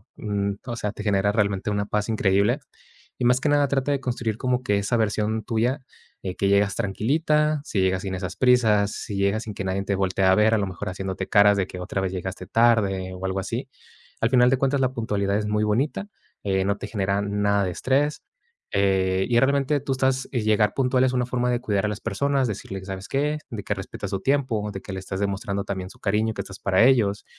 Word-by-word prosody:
mm, 100 Hz, -1 st, -2 dB
o 120 Hz, -, -4 dB
sea, 105 Hz, -3 st, -3 dB
te 105 Hz, -, -7 dB
genera 100 Hz, -1 st, +2 dB
realmente 100 Hz, -2 st, 0 dB
una 100 Hz, 0 st, -1 dB
paz 105 Hz, +1 st, -2 dB
increíble. 100 Hz, -2 st, +2 dB, 0.6 s
Y 125 Hz, -, 0 dB
más 125 Hz, +1 st, +4 dB
que 145 Hz, -, 0 dB
nada 145 Hz, -1 st, +3 dB
trata 135 Hz, +1 st, 0 dB
de 140 Hz, -, +1 dB
construir 120 Hz, -4 st, -2 dB
como 125 Hz, 0 st, 0 dB
que 105 Hz, -4 st, +1 dB
esa 100 Hz, +4 st, 0 dB
versión 110 Hz, 0 st, 0 dB
tuya, 120 Hz, +5 st, 0 dB, 0.4 s
eh, 95 Hz, -1 st, -4 dB
que 100 Hz, -, 0 dB
llegas 100 Hz, 0 st, +3 dB
tranquilita, 150 Hz, -, +1 dB
si 100 Hz, -, -1 dB
llegas 95 Hz, 0 st, +1 dB
sin 95 Hz, -1 st, -4 dB
esas 90 Hz, -1 st, -5 dB
prisas, 110 Hz, -5 st, +3 dB
si 105 Hz, -, -6 dB
llegas 100 Hz, +2 st, +1 dB
sin 110 Hz, -, -6 dB
que 100 Hz, -, -4 dB
nadie 95 Hz, +1 st, -2 dB
te 100 Hz, -, 0 dB
voltee 95 Hz, 0 st, 0 dB
a 95 Hz, 0 st, +5 dB
ver, 110 Hz, +1 st, +4 dB
a -, -, +4 dB
lo 100 Hz, -, -1 dB
mejor 95 Hz, +1 st, -5 dB
haciéndote 95 Hz, 0 st, -4 dB
caras 105 Hz, -1 st, +5 dB
de 95 Hz, -, +1 dB
que 90 Hz, -, -8 dB
otra 90 Hz, +2 st, -3 dB
vez 95 Hz, -1 st, -1 dB
llegaste 95 Hz, 0 st, -5 dB
tarde 100 Hz, -5 st, +2 dB
o 95 Hz, +1 st, -6 dB
algo 95 Hz, 0 st, -1 dB
así. 115 Hz, +7 st, -4 dB, 0.5 s
Al 115 Hz, -, +3 dB
final 125 Hz, -1 st, +5 dB
de 135 Hz, -, +3 dB
cuentas, 135 Hz, +1 st, +1 dB
la 130 Hz, -1 st, +1 dB
puntualidad 100 Hz, -4 st, -1 dB
es 105 Hz, -, -2 dB
muy 105 Hz, 0 st, +1 dB
bonita, 135 Hz, -, 0 dB, 0.3 s
eh, 95 Hz, -1 st, +1 dB
no 100 Hz, +1 st, 0 dB
te -, -, -6 dB
genera 100 Hz, -1 st, -1 dB
nada 100 Hz, 0 st, +1 dB
de 90 Hz, -, -1 dB
estrés, 140 Hz, -, 0 dB, 0.5 s
eh, 95 Hz, -1 st, +2 dB
y 120 Hz, -1 st, +4 dB
realmente 140 Hz, +2 st, +2 dB
tú 135 Hz, 0 st, -2 dB
estás 130 Hz, 0 st, 0 dB
y 125 Hz, -, 0 dB
llegar 105 Hz, -1 st, +2 dB
puntual 130 Hz, -1 st, +2 dB
es 130 Hz, -, 0 dB
una 125 Hz, -1 st, +1 dB
forma 125 Hz, 0 st, -1 dB
de 120 Hz, 0 st, 0 dB
cuidar 105 Hz, -3 st, 0 dB
a -, -, +1 dB
las 105 Hz, 0 st, -5 dB
personas, 140 Hz, -2 st, 0 dB
decirles: 95 Hz, -1 st, -6 dB
"¿Sabes 95 Hz, 0 st, -6 dB
qué?". 150 Hz, +2 st, 0 dB
De 105 Hz, -4 st, -6 dB
que 105 Hz, -, -1 dB
respetas 100 Hz, +1 st, -6 dB
su 95 Hz, -, -1 dB
tiempo, 125 Hz, -3 st, 0 dB
de 95 Hz, -, -6 dB
que -, -, -9 dB
le 95 Hz, -, -4 dB
estás 95 Hz, 0 st, -5 dB
demostrando 100 Hz, 0 st, -2 dB
también 95 Hz, -2 st, -5 dB
su -, -, -16 dB
cariño, 110 Hz, +2 st, 0 dB
que 100 Hz, -, -4 dB
estás 100 Hz, 0 st, -10 dB
para 95 Hz, +2 st, +3 dB
ellos. 115 Hz, -6 st, +3 dB
105 Hz, 230 wpm, -24 LUFS, 100-125 Hz, 0.6 s, a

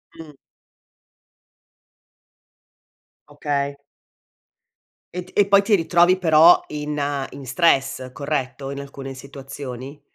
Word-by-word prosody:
Mh. 160 Hz, -2 st, -11 dB, 3.0 s
Okay. 140 Hz, -1 st, -3 dB, 1.4 s
E 180 Hz, 0 st, -5 dB
t 200 Hz, +2 st, +1 dB
poi 200 Hz, 0 st, +5 dB
ti 205 Hz, +1 st, +3 dB
ritrovi 175 Hz, +1 st, +3 dB
però 165 Hz, -1 st, +6 dB
in 150 Hz, 0 st, -5 dB, 0.3 s
in 140 Hz, -1 st, -10 dB
stress, 135 Hz, -5 st, +1 dB
corretto? 140 Hz, -2 st, -4 dB
In 140 Hz, 0 st, -6 dB
alcune 135 Hz, -1 st, -8 dB
situazioni? 135 Hz, 0 st, -9 dB
145 Hz, 90 wpm, -21 LUFS, 135-170 Hz, 3.0 s, però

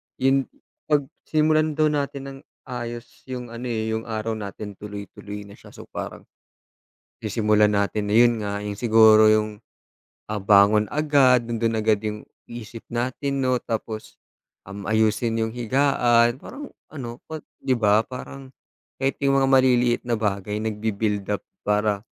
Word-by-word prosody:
'yon 135 Hz, 0 st, +2 dB, 0.4 s
pag 150 Hz, -2 st, +3 dB, 0.2 s
simulan 155 Hz, 0 st, +2 dB
daw 155 Hz, -1 st, +3 dB
natin 140 Hz, -2 st, -2 dB
ng 135 Hz, -, -10 dB, 0.3 s
ayos 120 Hz, +1 st, -7 dB
'yong 125 Hz, -2 st, -6 dB
ano, 120 Hz, +2 st, -6 dB
eh, 110 Hz, -1 st, -2 dB
'yong 110 Hz, +1 st, -3 dB
araw 110 Hz, 0 st, -3 dB
natin 100 Hz, +1 st, -7 dB
tuloy-tuloy 105 Hz, 0 st, -8 dB
na 100 Hz, -, -14 dB
siya. -, -, -15 dB
So -, -, -10 dB
parang, -, -, -6 dB, 1.0 s
sisimulan 105 Hz, -1 st, +2 dB
natin 105 Hz, +1 st, 0 dB
na 105 Hz, -, 0 dB
'yon 120 Hz, 0 st, +6 dB
nga, 100 Hz, 0 st, -3 dB
'yong 100 Hz, 0 st, -5 dB
siguro 110 Hz, -2 st, +6 dB
'yong, 110 Hz, -1 st, +1 dB, 0.7 s
ah, 105 Hz, -, -1 dB
bangon 100 Hz, +2 st, +5 dB
agad, 135 Hz, -5 st, +3 dB
nando'n 115 Hz, 0 st, 0 dB
agad 110 Hz, -1 st, +3 dB
'yong 105 Hz, 0 st, -4 dB, 0.3 s
isip 115 Hz, -1 st, -8 dB
natin, 130 Hz, +3 st, -2 dB
'no. 130 Hz, -1 st, +2 dB
Tapos, 110 Hz, -1 st, -5 dB, 0.5 s
um, 100 Hz, +1 st, -8 dB
ayusin 110 Hz, +1 st, +1 dB
'yong 110 Hz, +1 st, -1 dB
higaan, 120 Hz, -1 st, +2 dB
parang 285 Hz, +1 st, -9 dB, 0.2 s
ano, 120 Hz, -5 st, -7 dB
pag 155 Hz, -1 st, -6 dB, 0.2 s
'di 130 Hz, -, +2 dB
ba, 105 Hz, 0 st, +4 dB
parang, 130 Hz, +1 st, -9 dB, 0.5 s
kahit 135 Hz, 0 st, -1 dB
'yong 135 Hz, 0 st, +3 dB
mga 135 Hz, -, +2 dB
maliliit 125 Hz, -2 st, +4 dB
na 120 Hz, -, +1 dB
bagay 105 Hz, -1 st, -2 dB
nagbi-build 105 Hz, -2 st, -2 dB
up 105 Hz, -, -1 dB, 0.2 s
para, 105 Hz, -1 st, +1 dB
115 Hz, 150 wpm, -23 LUFS, 105-130 Hz, 1.0 s, yon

